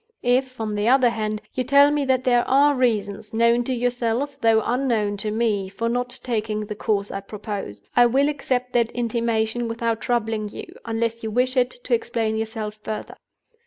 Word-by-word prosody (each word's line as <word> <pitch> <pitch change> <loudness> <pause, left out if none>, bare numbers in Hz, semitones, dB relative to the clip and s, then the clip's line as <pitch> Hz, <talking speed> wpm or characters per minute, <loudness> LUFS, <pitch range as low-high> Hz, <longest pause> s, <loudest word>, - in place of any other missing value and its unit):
If, 255 +1 +1
on 215 -1 -2
the 205 +1 0
other 255 -1 +5
hand, 215 -1 -3
you 255 - -1
tell 280 +3 +5
me 295 -1 0
that 260 -1 +1
there 245 -1 +3
are 285 +2 +5
reasons 220 -4 -1
(known 235 +1 +3
to 260 - -2
yourself, 245 +3 -1
though 225 -2 +4
unknown 230 -5 0
to 210 +2 -1
me) 210 -3 0
for 230 +4 -3
not 245 +1 -1
taking 215 -3 -2
the 210 - -5
course 205 -1 -1
I 195 - -3
propose, 200 - -6
I 245 0 +7
will 270 +4 +3
accept 255 -4 -2
that 235 -2 +2
intimation 230 -1 -1
without 230 0 -2
troubling 225 -3 -1
you, - - -8 0.2
unless 230 0 -2
you 220 - -3
wish 250 +4 +1
it, 250 -1 +3
to 250 - -1
explain 230 -1 0
yourself 220 -1 -4
further. 215 0 -5
230 Hz, 185 wpm, -23 LUFS, 215-250 Hz, 0.2 s, I